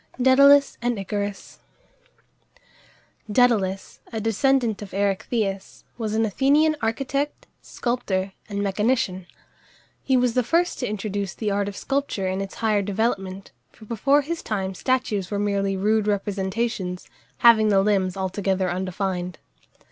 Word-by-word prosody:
DÆDALUS 280 +2 +6
and 240 -1 0
ICARUS. 200 0 -5 1.7
Dædalus, 205 -5 +1
a 225 - -3
descendant 225 +1 +1
of 195 -2 -8
Erechtheus, 200 0 -2
was 220 -3 -3
an 225 0 +2
Athenian 285 +8 +3
architect, 275 +5 -2 0.2
sculptor, 200 -6 -2 0.2
and 200 -1 -2
mechanician. 200 -2 0 0.7
He 265 -1 +2
was 250 -2 +2
the 250 - +3
first 335 +8 0
to 250 - -2
introduce 205 -2 -3
the 215 -2 -2
art 200 0 0
of 200 - -6
sculpture 275 -8 -2
in 190 +1 -2
its 195 - -6
higher 215 -3 +1
development, 195 -2 -2 0.2
for 220 - -16
before 275 +7 +2
his 330 +4 -4
time 195 -3 -3
statues 215 -4 -1
were 205 - -2
merely 200 -1 0
rude 215 +2 +1
representations, 200 -1 -2 0.3
having 225 -3 +6
the 195 -1 +4
limbs 195 -3 +1
altogether 190 -1 -1
undefined. 185 -1 -3
210 Hz, 130 wpm, -24 LUFS, 195-245 Hz, 1.7 s, DÆDALUS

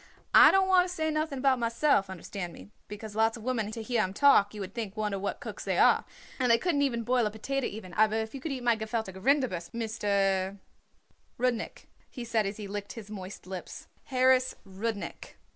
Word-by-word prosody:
"I - - +10
don't 385 0 +3
want 365 -1 +5
to - - -6
say 315 -3 -1
nothing 310 -2 -1
about 260 -1 +2
myself, 230 -3 +2
understand 180 -1 -6
me, 95 +2 -13 0.2
because 210 0 -8
lots 225 +1 +2
of 225 - -11
women 230 -4 -1
to 220 +1 -6
hear 235 -1 +1
'em 190 -1 -2
talk 240 -8 +5
you - - -7
would 195 -1 -6
think 215 -3 -5
wonder 210 -2 -1
what 200 - -3
cooks - - -7
they - - -1
are, - - +5 0.3
and 250 -1 +2
they 230 - +6
couldn't 295 +1 0
even 240 -5 0
boil 245 -1 +2
a - - -1
potater 265 +6 -3
even; 195 -4 -9
aber 215 0 +3
if 220 0 -2
you 275 - -7
could 315 - -4
eat 260 -2 -4
my 240 -1 +4
gefüllte 220 -2 -3
Rinderbrust, 190 -5 0
Mister 200 -4 0 0.4
" - - -40
"Rudnik," 245 -2 -1 0.2
he 245 -3 -7
said 225 -3 +1
as 200 - -5
he 210 -2 -6
licked 205 0 -5
his 215 -3 -10
moist 190 -2 -8
lips, 185 -1 -8 0.2
"Harris 255 -1 +3
Rudnik." 200 +2 -5
220 Hz, 210 wpm, -29 LUFS, 200-255 Hz, 0.4 s, I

